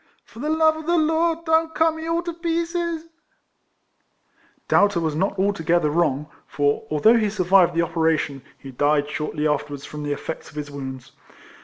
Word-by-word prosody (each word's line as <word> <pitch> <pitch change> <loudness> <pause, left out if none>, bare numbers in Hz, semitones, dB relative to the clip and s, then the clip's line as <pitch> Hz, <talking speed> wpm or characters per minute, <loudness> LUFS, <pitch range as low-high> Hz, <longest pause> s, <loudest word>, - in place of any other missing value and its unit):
For 225 - -15
the 295 +4 -2
love 315 0 +3
of 315 0 -9
the 345 0 +3
Lord 325 +1 +1
don't 320 0 +2
cut 320 0 +3
me 320 0 -7
all 335 +1 0
to 340 -1 -4
pieces! 335 0 -2 0.8
" - - -40
Doubter 205 -3 +3
was 160 -2 -1
not 190 +5 -1
altogether 175 -5 +1
wrong; 150 -3 +1 0.2
for, 145 0 0
although 185 +11 +4
he 215 -2 +1
survived 185 -3 +3
the 170 - +3
operation, 160 -4 0 0.2
he 135 - -11
died 145 +2 +1
shortly 150 0 -2
afterwards 145 -1 -2
from 150 - -8
the 145 0 -3
effects 160 +2 -6
of 145 - -18
his 145 -1 -5
wounds. 130 -3 -7
175 Hz, 175 wpm, -23 LUFS, -, 0.8 s, although